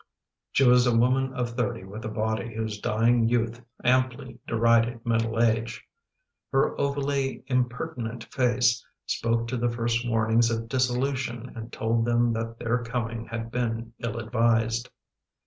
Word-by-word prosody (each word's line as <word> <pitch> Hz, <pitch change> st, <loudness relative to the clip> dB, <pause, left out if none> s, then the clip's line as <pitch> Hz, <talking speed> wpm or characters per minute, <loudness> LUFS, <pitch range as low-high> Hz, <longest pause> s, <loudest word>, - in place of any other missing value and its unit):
She 135 Hz, -, +4 dB
was 125 Hz, 0 st, +6 dB
a 120 Hz, -1 st, +3 dB
woman 130 Hz, +3 st, +2 dB
of 120 Hz, -2 st, -1 dB
thirty 120 Hz, -5 st, -2 dB
with 100 Hz, +3 st, -8 dB
a -, -, -2 dB
body 110 Hz, 0 st, -2 dB
whose 110 Hz, -2 st, -3 dB
dying 115 Hz, +1 st, +3 dB
youth 120 Hz, 0 st, 0 dB, 0.2 s
amply 130 Hz, 0 st, +1 dB
derided 115 Hz, +1 st, +2 dB
middle 115 Hz, -1 st, 0 dB
age. 115 Hz, 0 st, +1 dB, 0.7 s
Her 135 Hz, 0 st, +2 dB
ovally 140 Hz, -1 st, -1 dB
impertinent 120 Hz, -2 st, -2 dB
face 120 Hz, -3 st, +2 dB, 0.2 s
spoke 115 Hz, 0 st, 0 dB
to 125 Hz, -, -1 dB
the 120 Hz, +1 st, +1 dB
first 120 Hz, 0 st, -1 dB
warnings 115 Hz, 0 st, +3 dB
of 115 Hz, 0 st, -2 dB
dissolution 125 Hz, -1 st, -1 dB
and 115 Hz, 0 st, -7 dB
told 115 Hz, +1 st, 0 dB
them 120 Hz, 0 st, +2 dB
that 115 Hz, 0 st, -4 dB
their 120 Hz, +1 st, -1 dB
coming 115 Hz, -1 st, -3 dB
had 115 Hz, 0 st, -5 dB
been 115 Hz, -1 st, -2 dB
ill 115 Hz, -1 st, -3 dB
advised. 115 Hz, 0 st, +1 dB
115 Hz, 145 wpm, -26 LUFS, 115-125 Hz, 0.7 s, was